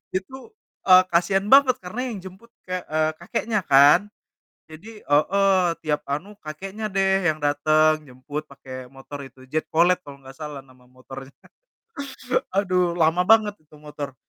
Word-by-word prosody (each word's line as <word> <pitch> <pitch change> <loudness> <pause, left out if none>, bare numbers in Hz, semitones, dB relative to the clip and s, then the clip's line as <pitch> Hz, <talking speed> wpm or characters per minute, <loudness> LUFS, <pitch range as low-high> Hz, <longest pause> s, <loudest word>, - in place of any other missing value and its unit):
Itu, 265 - -6 0.4
eee, 185 -1 +7
kasian 190 +3 +2
banget, 265 +1 +6
karena 185 +7 -6
yang 215 - -6
jemput 190 +5 -13 0.2
kek 185 0 -3
eee, 155 0 +1
kakeknya 210 +4 -2
kan. 145 +8 +6 0.6
Jadi 210 +8 -12
heeh, 190 +5 +2 0.2
tiap 150 -1 -1
anu 150 +9 -4
kakeknya 190 +8 -7
deh 195 -1 +1
yang 155 - +1
datang, 155 +2 +2
jemput 135 +4 -7
pake 130 -2 -10
motor 135 +1 -10
itu, 130 0 -15
Jet 155 0 -2
Cooled 175 +3 +3
kalo 140 -4 -14
gak 135 - -11
salah 150 -3 -7
nama 130 -1 -22
motornya. 130 +1 -12 1.2
Aduh, 180 -3 +1
lama 165 +1 +2
banget 220 -1 +5
itu 150 0 -20
motor. 150 -2 -8
160 Hz, 145 wpm, -23 LUFS, 145-195 Hz, 1.2 s, eee